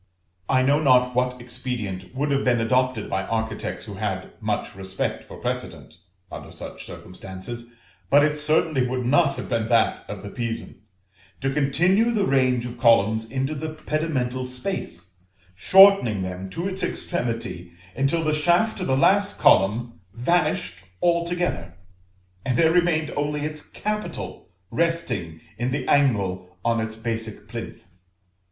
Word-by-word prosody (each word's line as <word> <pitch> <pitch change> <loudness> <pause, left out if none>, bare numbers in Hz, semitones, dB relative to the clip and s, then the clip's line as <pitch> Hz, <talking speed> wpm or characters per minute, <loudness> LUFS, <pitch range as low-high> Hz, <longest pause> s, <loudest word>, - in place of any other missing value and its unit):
I 130 -1 +4
know 145 +3 +3
not 125 -3 +4
what 125 0 0
expedient 110 -7 -5
would 145 +2 0
have 140 0 +1
been 120 -2 +3
adopted 125 0 +1
by 95 - -1
architects 110 0 -3
who - - -8
had - - -3
much - - -2
respect 95 0 -4
for - - -11
precedent, - - -5 0.3
under - - -8
such - - -8
circumstances, 105 +6 -8 0.3
but 145 +4 +6
it 150 0 -1
certainly 155 -3 +2
would 125 0 -2
not 145 +3 +3
have - - -6
been 115 -3 -1
that 115 -1 +2
of - - -7
the 100 - -7
Pisan, 115 -5 -5 0.6
to 135 0 0
continue 175 +10 +3
the 215 -4 +1
range 130 -4 +2
of 120 0 -7
columns 110 -1 +4
into 135 +4 -1
the 155 +1 -5
pedimental 130 -5 -2
space, 125 - -5 0.4
shortening 185 - +6
them 95 +1 -5
to 170 - -3
its 190 0 -4
extremity 115 - -3 0.2
until 135 +6 +1
the 155 -1 +1
shaft 175 +8 +2
of 185 - -2
the 130 0 +2
last 200 +7 +3
column 115 +5 +3 0.2
vanished 125 - 0 0.2
altogether, 170 - 0 0.7
and 130 -2 0
there 160 -1 +5
remained 165 -3 +2
only 145 0 -1
its 155 0 -4
capital 210 +5 -5 0.2
resting 125 - -1 0.2
in 120 +1 0
the 130 0 -2
angle 100 -10 +1
on 115 -1 +2
its 110 0 -4
basic 110 -2 -4
plinth. 115 -4 -8
125 Hz, 145 wpm, -24 LUFS, 110-155 Hz, 0.7 s, but